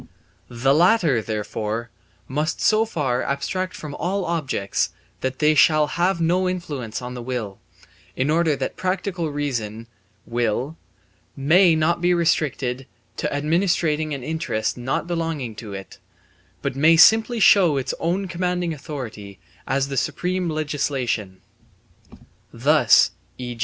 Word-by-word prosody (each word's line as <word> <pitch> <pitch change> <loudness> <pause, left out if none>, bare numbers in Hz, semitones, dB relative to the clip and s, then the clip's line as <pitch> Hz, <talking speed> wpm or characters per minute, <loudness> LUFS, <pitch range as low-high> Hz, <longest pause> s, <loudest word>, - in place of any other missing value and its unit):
The 125 +3 +1
latter 165 - +4
therefore 110 +1 -4 0.4
must 150 +4 -2
so 220 +1 +3
far 135 - -1
abstract 185 +7 -2
from 150 -2 -7
all 185 +4 -2
objects 150 -12 -1 0.3
that 130 0 -3
they 155 +1 +4
shall 155 +1 +5
have 175 +4 0
no 180 +3 +2
influence 145 -11 -5
on 125 0 -6
the 125 - -6
will, 120 -5 -4 0.6
in 135 +3 0
order 160 -2 +2
that - - -4
practical 185 -2 -2
reason 120 -7 -3 0.4
(will) 120 +5 -1 0.6
may 165 +5 +4
not 160 +2 +1
be 175 0 +3
restricted 135 -6 0 0.3
to 150 - -2
administering 155 0 0
an 140 -3 -4
interest 160 -7 -2
not 125 +5 -2
belonging 165 -8 -3
to 105 -3 -8
it, 95 0 -9 0.6
but - - -2
may 160 +4 +5
simply 225 +6 +6
show 180 -8 +5
its 135 - -2
own 180 +4 -1
commanding 180 -1 -1
authority 120 - -8 0.3
as 135 +1 0
the 135 - -4
supreme 180 +6 -1
legislation. 135 -10 -2 1.1
Thus, - - +4 0.3
e. 125 -1 -6
150 Hz, 130 wpm, -22 LUFS, 125-170 Hz, 1.1 s, simply